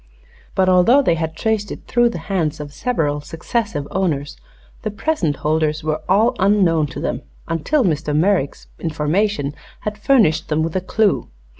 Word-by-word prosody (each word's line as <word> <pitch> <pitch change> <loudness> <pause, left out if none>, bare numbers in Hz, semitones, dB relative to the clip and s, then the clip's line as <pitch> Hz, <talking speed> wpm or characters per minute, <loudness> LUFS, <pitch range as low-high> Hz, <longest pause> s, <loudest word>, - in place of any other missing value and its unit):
But 190 -1 +3
although 185 +10 +5
they 210 - +3
had 160 -1 -3
traced 215 +1 -1
it - - -8
through 240 0 +3
the 230 - -5
hands 160 -6 -1
of 145 -1 -7
several 150 - -1
successive 165 0 -3
owners 155 -6 -1 0.5
the 215 - -2
present 210 - -1
holders 155 +1 0
were 155 0 -1
all 215 +6 +4
unknown 185 -6 +3
to 130 - -7
them 120 - -2 0.3
until 170 - +1
Mr. 155 -5 0
Merrick's 175 -4 +1
information 160 0 0 0.3
had 210 0 -4
furnished 215 - +3
them 155 0 +1
with 165 +1 -3
a 185 - +1
clue. 205 +2 +1
170 Hz, 160 wpm, -20 LUFS, 155-210 Hz, 0.5 s, although